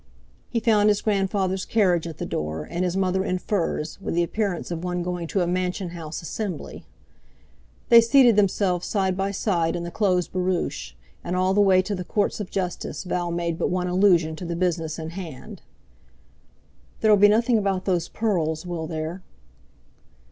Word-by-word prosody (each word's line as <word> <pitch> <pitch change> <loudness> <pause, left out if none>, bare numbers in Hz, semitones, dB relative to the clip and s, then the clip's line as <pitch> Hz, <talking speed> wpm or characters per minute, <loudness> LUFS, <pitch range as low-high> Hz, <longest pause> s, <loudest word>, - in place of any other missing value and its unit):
He 235 - 0
found 215 -2 +3
his 205 -1 +2
grandfather's 195 -2 0
carriage 180 -7 +2
at 160 - -8
the - - -4
door, 75 0 -4
and 175 - -2
his 180 +1 -1
mother 190 0 +1
in 185 -2 -1
furs, 180 -3 -2
with 190 - -3
the 175 - +3
appearance 195 -1 -2
of 170 0 -4
one 180 -1 -2
going 175 -1 -3
to 190 - 0
a - - +2
Mansion 180 +1 -1
House 165 -1 -7
Assembly. 200 +2 -5 1.0
They 235 -1 +9
seated 240 -1 +5
themselves 190 -3 +1
side 190 -3 0
by 195 +1 -1
side 175 -5 0
in 170 - -3
the 170 - -5
closed 180 -4 +1
barouche, 180 - -2 0.3
and 175 - -3
all 185 +1 +2
the 205 - +4
way 190 -2 +5
to 205 - -3
the 180 -2 -3
Courts 205 +4 -1
of 205 -3 -5
Justice 185 -1 -3
Val 180 -2 -2
made 170 -1 -2
but - - 0
one 180 0 -1
allusion 180 -4 +3
to 180 - -7
the 170 0 -3
business 165 -3 -1
in 160 -1 -6
hand. 170 -7 -8 1.4
"There'll 215 -1 +6
be 205 +1 +6
nothing 230 +2 +3
about 195 -2 -1
those 180 -3 0
pearls, 170 -8 -1
will 170 -2 -4
there?" 160 +3 -4
185 Hz, 180 wpm, -24 LUFS, 170-200 Hz, 1.4 s, They